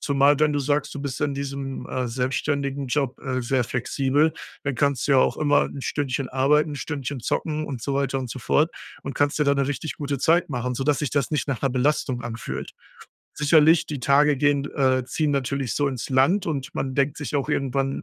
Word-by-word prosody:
Zumal, 140 0 +3
wenn 150 -1 +3
du 145 - 0
sagst, 145 +1 0
du 145 - -5
bist 140 0 -4
in 145 -1 0
diesem, 135 -1 -5
äh, 130 -1 -2
selbstständigen 135 +2 -1
Job, 135 0 -1
äh, 130 -2 -2
sehr 125 0 +1
flexibel, 135 +5 +1 0.3
dann 140 -4 -2
kannst 140 -1 +1
du - - +4
ja 130 - +6
auch - - +2
immer 145 -1 +3
'n 140 - -7
Stündchen 135 -2 -2
arbeiten, 150 +4 +2
'n - - -5
Stündchen 140 -2 -4
zocken 155 +5 -2
und 130 -5 -6
so 140 - -2
weiter 135 -1 0
und 125 - -5
so 130 - -5
fort 155 +6 +2 0.3
und 135 - -5
kannst 145 +1 +1
dir - - +4
da 140 0 +3
'ne 140 -1 +1
richtig 145 +2 -4
gute 140 -2 -3
Zeit 170 +5 +3
machen, 125 -1 -2
sodass 140 +2 0
sich 145 -5 -1
das 145 0 0
nicht 150 - -1
nach 135 -4 -2
'ner 135 - +3
Belastung 130 -1 0
anfühlt. 115 -2 -5 0.6
Sicherlich, 155 +2 +5
die 150 - -4
Tage 140 +3 +4
gehen 145 0 +2
d - - -6
äh, 130 -2 +2
ziehen 150 +4 -1
natürlich 135 -2 -1
so 145 -1 +1
ins 130 -3 -4
Land 140 +10 +3
und 145 -2 -3
man 130 -1 -2
denkt 140 +1 +1
sich 145 0 -5
auch 140 - -1
irgendwann: 135 -1 -1
140 Hz, 220 wpm, -24 LUFS, 130-145 Hz, 0.6 s, ja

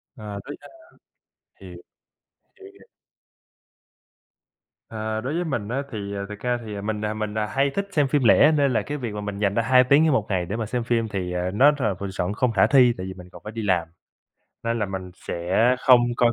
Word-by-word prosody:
Ờ, 105 -4 -7
tới, 145 - -7
ơ - - -13 0.9
hiều - - -11 0.9
hiểu, 395 -3 -14
hiểu. 430 - -20 2.0
À, 110 0 -3
đối 135 +5 -3
với 175 +1 -1
mình 120 -9 -3
á 135 +3 -2
thì 110 - -5 0.3
thực 105 0 -8
ra 125 0 -1
thì 105 -2 -6
mình, 105 0 -3
à, 105 - -2
mình, 110 0 -4
à, 105 - 0
hay 135 +5 0
thích 200 +7 -3
xem 150 -6 +2
phim 145 -2 +1
lẻ, 145 +6 +6
nên 140 -4 +2
là - - +2
cái 150 0 -5
việc 120 -5 -5
mà 105 - -5
mình 105 -1 -5
dành 100 -1 +1
ra 115 - +2
2 125 +2 +5
tiếng 140 +4 +4
trên 155 - +3
1 110 -6 +1
ngày 90 -3 0
để 100 - -4
mà 115 -1 -2
xem 120 +2 -2
phim 115 -1 0
thì, 95 -4 -4
à, 90 +1 -2
nó 140 +8 +6
rà 110 -6 +1
m 100 -1 -4
chọn 95 +1 -2
không 125 +1 0
khả 95 -4 +4
thi, 125 -4 +5
tại 90 - -5
vì 95 - -6
mình 90 -1 -13
còn - - -13
phải 105 - -7
đi 115 0 -5
làm, 90 -5 +1 0.8
nên 115 0 -1
là 105 - -1
mình 95 -1 -6
sẽ 85 -1 -6 0.3
không 130 -1 +6 0.2
coi. 120 -1 +3
110 Hz, 230 wpm, -24 LUFS, 100-130 Hz, 2.0 s, lẻ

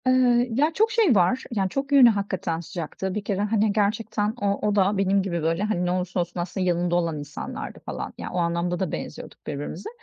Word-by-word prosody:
Eee, 250 -1 +4
ya, 290 +8 +2
çok 440 +6 +2
şey 425 - +4
var. 190 +8 +3
Yani, 195 -4 0
çok 275 +6 -3
yönü; 270 -4 +8
hakikaten 190 -6 -1
sıcaktı. 175 +2 -5
Bir 210 - -2
kere 200 -1 -1
hani, 210 0 +2
gerçekten 210 0 0
o 200 +1 0
o 205 - +1
da 200 0 +3
benim 195 0 +2
gibi 175 -3 -2
böyle 165 +4 +1
hani, 210 -4 0
ne 175 - 0
olursa 180 0 -1
olsun 175 0 -2
aslında 185 +2 -2
yanında 175 0 +1
olan 165 -3 0
insanlardı 145 0 -7
falan. - - -6
Yani, - - -6
o - - -2
anlamda 170 +1 0
da 185 -4 -1
benziyorduk - - -7
birbirimize. 145 +6 -5
195 Hz, 210 wpm, -25 LUFS, 175-220 Hz, -, yönü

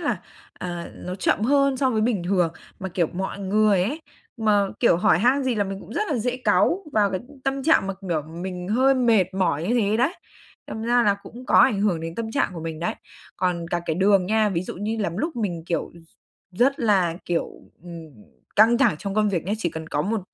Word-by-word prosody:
là, - - -1 0.3
à, 175 -1 -6
nó 180 - -6
chậm 185 - 0
hơn 275 +1 +3
so 260 0 +1
với 220 -3 0
bình 215 -4 0
thường. 180 -3 +1 0.3
Mà, 190 - -4
kiểu, 175 -2 0
mọi 190 +4 -5
người 200 -1 +2
ấy, 275 - -2 0.4
mà, 210 -3 +3 0.2
kiểu, 235 - +4
hỏi 170 -1 +3
han 255 +6 +3
gì 255 -2 +1
là 205 - +1
mình 195 0 -5
cũng 220 - -11
rất 420 - +1
là 275 - +1
dễ 250 +3 -1
cáu 360 +8 +2
vào 205 -2 +3
cái, 185 - -2
ưm, 285 -2 -17
tâm 270 0 -1
trạng, 315 -10 +3
mà, 195 - -3
kiểu, 170 -6 -2
mình 180 +3 -6
hơi 260 +5 +3
mệt 225 -8 +2
mỏi 180 -5 0
như 240 - +2
thế 210 +1 +1
đấy, 265 +10 +1 0.5
đâm 220 - -6
ra 240 +1 +3
là 205 -3 +3
cũng 250 +2 -11
có - - 0
ảnh 200 -2 +5
hưởng 190 -6 +1
đến 165 0 -6
tâm 225 +1 -4
trạng 280 - 0
của 165 - -6
mình 160 -1 -5
đấy. 175 - -1 0.4
Còn 175 -2 -1
cả 175 0 -1
cái 160 - 0
đường 195 0 +3
nha, 215 +1 +2
ví 175 -2 -1
dụ - - -7
như 210 +4 -3
lắm 180 -4 -2
lúc 315 - -3
mình, 175 -7 -2
kiểu, 170 - -2
r - - -15 0.6
rất 275 +2 +3
là, 190 -7 +2
kiểu, 170 -1 -1 0.3
ừm, 170 -2 -9 0.5
căng 230 +3 +6
thẳng 235 - +3
trong 200 0 -4
công 215 0 +2
việc 175 -5 -1
nhá, 195 - -2
chỉ 175 -6 -1
cần 160 0 -7
có 145 - -1
một 215 +4 -1
200 Hz, 235 wpm, -23 LUFS, 175-235 Hz, 0.6 s, căng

